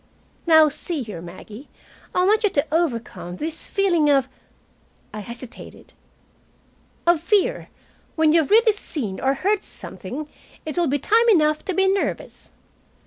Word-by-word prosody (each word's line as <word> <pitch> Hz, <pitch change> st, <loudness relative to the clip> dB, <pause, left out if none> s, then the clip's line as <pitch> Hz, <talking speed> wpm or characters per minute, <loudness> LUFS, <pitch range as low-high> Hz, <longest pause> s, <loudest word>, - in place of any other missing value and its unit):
"Now, 315 Hz, -2 st, +7 dB
see 300 Hz, 0 st, -3 dB
here, 210 Hz, -7 st, -8 dB
Maggie, 205 Hz, -, -11 dB, 0.5 s
I 360 Hz, -, +3 dB
want 430 Hz, +3 st, +3 dB
you 420 Hz, -, +4 dB
to 285 Hz, -5 st, 0 dB
overcome 240 Hz, -, -2 dB
this 320 Hz, -, -5 dB
feeling 345 Hz, -7 st, +2 dB
of 270 Hz, -3 st, +3 dB, 0.5 s
" -, -, -37 dB
I 215 Hz, -, -5 dB
hesitated 235 Hz, +3 st, -11 dB, 1.1 s
"of 340 Hz, -2 st, +3 dB
fear. 420 Hz, +7 st, +1 dB, 0.5 s
When 315 Hz, -1 st, +3 dB
you 330 Hz, -, +5 dB
have 295 Hz, -, -4 dB
really 445 Hz, +1 st, +5 dB
seen 245 Hz, -, -5 dB
or 270 Hz, +1 st, +1 dB
heard 400 Hz, +7 st, 0 dB
something, 265 Hz, +10 st, -8 dB, 0.4 s
it 310 Hz, -, -5 dB
will 350 Hz, -2 st, +1 dB
be 285 Hz, +1 st, +1 dB
time 455 Hz, -, +3 dB
enough 305 Hz, -6 st, +3 dB
to 380 Hz, -, -2 dB
be 385 Hz, 0 st, +3 dB
nervous." 390 Hz, +1 st, -2 dB
315 Hz, 150 wpm, -22 LUFS, 265-385 Hz, 1.1 s, Now